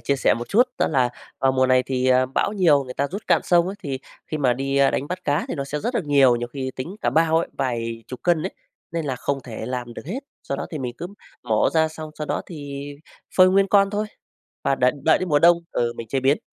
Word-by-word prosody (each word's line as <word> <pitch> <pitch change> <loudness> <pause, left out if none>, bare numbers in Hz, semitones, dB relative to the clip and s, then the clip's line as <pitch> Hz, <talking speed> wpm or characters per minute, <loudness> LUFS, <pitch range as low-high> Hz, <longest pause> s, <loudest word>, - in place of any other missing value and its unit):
chia 140 - 0
sẻ 135 - +3
một 120 +1 -6
chút 230 - +5 0.2
đó - - +2
là 130 -5 +2 0.3
vào 135 0 +3
mùa 130 0 +3
này 130 0 +4
thì, 130 -1 0
à, 130 0 +4
bão 135 +9 0
nhiều 165 -9 +4
người 125 -1 -8
ta 140 - 0
rút 200 +6 -6
cạn - - +4
sông 175 -1 +4
ấy, 190 - -4
thì 135 -3 -3 0.3
khi 155 - -3
mà 130 -4 +3
đi, 135 +2 -2
a, 140 0 +5
đánh 140 - -2
bắt 180 +1 -5
cá, 145 0 +1
thì - - -2
nó 140 - -3
sẽ 150 +2 -4
rất 240 - -2
được 205 - 0
nhiều, 140 -4 +5
nhiều 120 0 -4
khi 130 0 -4
tính 170 +10 -6
cả - - +1
bao 160 0 +3
ấy, 170 - -2
vài 115 -3 -2
chục 130 - -8
cân 170 -3 +2
ấy. 190 - -2 0.4
Nên 165 -1 -2
là 135 -3 -2
không 140 +2 -2
thể 110 -2 -6
làm 125 -1 -4
được - - -9
hết, 230 +10 -3 0.2
sau 140 - -3
đó - - -4
thì 155 - -4
mình 125 -3 -4
cứ 175 - -4 0.4
mổ 110 -3 +2
ra 160 -1 +4
xong 155 0 -8
sau 150 - -3
đó - - -2
thì 145 -4 -7 0.5
phơi 185 0 +8
nguyên 195 +1 +4
con 200 0 +4
thôi, 210 +1 -1 0.6
và 135 - +3
đợi 125 -1 +3
đợi 160 - +5
đến 185 - -3
mùa 145 -2 +4
đông 170 +2 +6
ừ, 120 -1 0
mình 115 - -7
chế 135 +4 0
biến. 135 +3 +3
140 Hz, 270 wpm, -23 LUFS, 130-170 Hz, 0.6 s, phơi